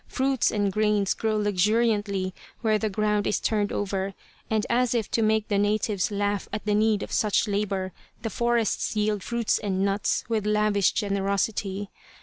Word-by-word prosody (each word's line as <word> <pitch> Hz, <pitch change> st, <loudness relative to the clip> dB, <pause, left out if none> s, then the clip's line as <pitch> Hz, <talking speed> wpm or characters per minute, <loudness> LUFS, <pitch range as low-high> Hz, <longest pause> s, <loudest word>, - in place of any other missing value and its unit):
Fruits 265 Hz, -1 st, +1 dB
and 205 Hz, -2 st, 0 dB
grains 210 Hz, -2 st, +2 dB
grow 220 Hz, -1 st, -1 dB
luxuriantly 205 Hz, -1 st, +1 dB, 0.3 s
where 215 Hz, -2 st, +2 dB
the 215 Hz, -, -1 dB
ground 210 Hz, 0 st, 0 dB
is -, -, +1 dB
turned 210 Hz, -2 st, 0 dB
over, 195 Hz, -1 st, -2 dB, 0.3 s
and 215 Hz, -1 st, +1 dB
as 245 Hz, 0 st, +1 dB
if 225 Hz, -4 st, -1 dB
to 230 Hz, -, +1 dB
make 220 Hz, 0 st, +2 dB
the 205 Hz, -2 st, +1 dB
natives 210 Hz, +1 st, +1 dB
laugh 205 Hz, -1 st, -1 dB
at 215 Hz, -, -4 dB
the 210 Hz, -, +1 dB
need 215 Hz, 0 st, +2 dB
of -, -, -8 dB
such 210 Hz, +1 st, +2 dB
labour 200 Hz, -2 st, -1 dB, 0.3 s
the 225 Hz, -, -2 dB
forests 235 Hz, -1 st, 0 dB
yield 210 Hz, -1 st, 0 dB
fruits 235 Hz, 0 st, 0 dB
and 195 Hz, -2 st, -1 dB
nuts 200 Hz, +1 st, 0 dB
with 220 Hz, -2 st, -1 dB
lavish 210 Hz, -2 st, +2 dB
generosity. 200 Hz, 0 st, -1 dB
210 Hz, 165 wpm, -26 LUFS, 200-220 Hz, 0.3 s, grains